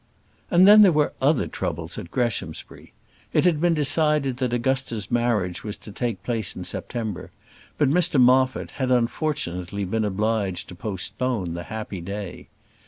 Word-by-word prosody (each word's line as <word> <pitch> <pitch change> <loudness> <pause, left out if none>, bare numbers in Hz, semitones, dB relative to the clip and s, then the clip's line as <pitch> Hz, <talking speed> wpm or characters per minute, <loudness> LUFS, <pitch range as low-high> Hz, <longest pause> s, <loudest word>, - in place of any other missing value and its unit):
And 180 +1 +6
then 210 +1 +9
there 200 -3 +7
were 150 -2 +1
other 140 +1 +3
troubles - - -5
at 85 - -9
Greshamsbury. 110 -10 -4 0.4
It - - +3
had 165 -4 +2
been 175 -1 +3
decided 150 -2 +2
that 125 -2 -1
Augusta's 120 -4 -1
marriage 115 -7 0
was 105 -1 -5
to 105 - -12
take 110 -3 -3
place 115 -5 -2
in - - -6
September; 110 -6 -4 0.5
but 145 - +3
Mr 150 -1 +2
Moffat 130 +1 +3
had, 130 - +1
unfortunately, 115 - -1
been 110 +4 -1
obliged 105 -2 -1
to - - -8
postpone 100 +1 -3
the 85 0 -6
happy 105 -4 -6
day. 100 +1 -7
120 Hz, 155 wpm, -24 LUFS, 100-135 Hz, 0.5 s, then